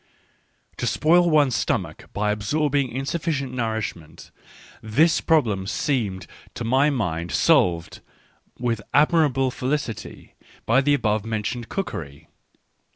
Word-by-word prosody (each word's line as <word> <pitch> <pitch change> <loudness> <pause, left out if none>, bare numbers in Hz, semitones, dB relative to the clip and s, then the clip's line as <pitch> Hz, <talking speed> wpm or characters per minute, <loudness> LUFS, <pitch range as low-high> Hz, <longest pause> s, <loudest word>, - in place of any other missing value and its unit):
To 125 - -2
spoil 170 - +3
one's 145 -6 +3
stomach - - -2
by 105 0 0
absorbing 140 +6 0
insufficient 135 +1 -3
nourishment 110 -9 -4 0.3
— - - -20 0.2
this 150 +10 +2
problem 110 -12 +1
seemed 105 - -1 0.3
to 120 - -4
my 130 +5 +3
mind 90 - -2
solved 85 -2 +2 0.6
with 115 -3 -1
admirable 145 -4 +3
felicity 130 -3 -4 0.3
by 120 +4 +4
the 145 +1 +3
above 110 -5 0
men 110 -1 -3
tioned 120 +1 -4
cookery. 80 - -6
125 Hz, 115 wpm, -23 LUFS, 105-145 Hz, 0.6 s, by